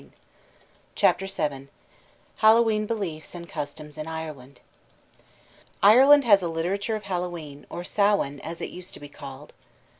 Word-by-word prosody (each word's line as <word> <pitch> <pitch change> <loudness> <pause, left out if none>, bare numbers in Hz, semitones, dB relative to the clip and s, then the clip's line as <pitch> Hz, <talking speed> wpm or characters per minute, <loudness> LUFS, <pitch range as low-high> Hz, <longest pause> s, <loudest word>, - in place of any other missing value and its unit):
] - - -31 0.3
CHAPTER 195 - +2
VII 145 -8 -3 0.7
HALLOWE'EN 220 -1 +4
BELIEFS 180 -9 -4
AND 170 -1 -8
CUSTOMS 150 -1 -7
IN 155 - -5
IRELAND 155 -5 -7 1.2
Ireland 270 +8 +8
has 205 -5 +5
a 175 - -2
literature 185 +7 -2
of 215 - -6
Hallowe'en, 175 -6 -5
or 175 - -6
"Samhain," 200 -8 +1
as 165 +4 -7
it - - -5
used 180 0 -10
to - - -11
be 145 - -10
called. 140 0 -11
175 Hz, 140 wpm, -25 LUFS, 150-205 Hz, 1.2 s, Ireland